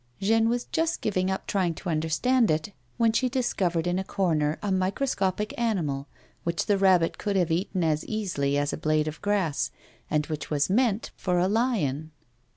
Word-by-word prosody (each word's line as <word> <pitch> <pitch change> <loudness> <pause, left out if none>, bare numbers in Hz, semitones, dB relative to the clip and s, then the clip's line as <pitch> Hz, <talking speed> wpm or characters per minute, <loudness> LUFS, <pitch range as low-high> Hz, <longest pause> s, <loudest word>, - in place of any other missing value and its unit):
Jeanne 225 +3 +3
was 240 +1 -1
just 325 0 0
giving 185 -3 0
up 190 - -2
trying 180 -4 0
to 185 - -8
understand 170 +10 +2
it 160 +6 -1 0.2
when 230 -1 +3
she 255 +2 +2
discovered 185 -10 0
in 175 +1 0
a - - -2
corner 160 -6 0
a 205 - -1
microscopic 195 +1 0
animal, 160 -12 -1 0.4
which 170 0 -1
the 205 - +3
rabbit 185 -4 +3
coiild 205 -1 -1
have 175 -3 +2
eaten 185 +2 0
as 155 -1 +1
easily 175 -10 -1
as 145 0 0
a - - -2
blade 155 0 +1
of 155 0 -6
grass, 165 -12 0 0.4
and 150 -1 +1
which 155 -1 -5
was 150 +3 +1
meant 225 -1 +1
for 180 -1 -1
a 180 +1 +3
lion. 190 - 0
185 Hz, 180 wpm, -27 LUFS, 155-210 Hz, 0.4 s, Jeanne